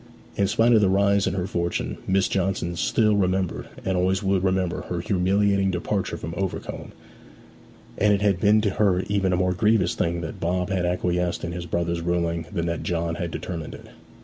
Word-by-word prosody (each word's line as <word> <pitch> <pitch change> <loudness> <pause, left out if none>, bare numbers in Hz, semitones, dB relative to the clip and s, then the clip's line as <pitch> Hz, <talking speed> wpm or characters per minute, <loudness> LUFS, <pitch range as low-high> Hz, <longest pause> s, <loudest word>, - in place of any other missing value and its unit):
In 100 - +2
spite 115 +3 +3
of 110 - +5
the 100 - +3
rise 100 +1 +3
in - - -1
her 90 -2 -1
fortunes, 85 -2 -2
Miss 95 0 +2
Johnson 95 -2 -1
still 105 +5 +2
remembered 95 -2 0 0.2
and 95 - 0
always 95 +2 +1
would 95 -1 +1
remember 95 -2 0
her 90 - -2
humiliating 95 +2 +2
departure 95 +2 -2
from 80 - -6
Overcombe; 95 0 -4 1.1
and 105 +1 +4
it 100 0 +2
had 100 -3 +2
been 105 +3 +4
to 105 -2 +1
her 95 -3 +2
even 100 -2 +1
a 90 - +2
more 90 0 +1
grievous 95 0 +2
thing 85 0 -1
that 80 - -6
Bob 90 +3 -1
had 90 -2 0
acquiesced 90 0 -1
in 85 - -3
his 85 0 -5
brother's 85 0 -1
ruling 85 -1 -1
than 85 -4 -2
that 85 0 -2
John 85 -1 -1
had 85 +1 -3
determined 80 -1 -6
it. - - -13
90 Hz, 195 wpm, -24 LUFS, 85-100 Hz, 1.1 s, of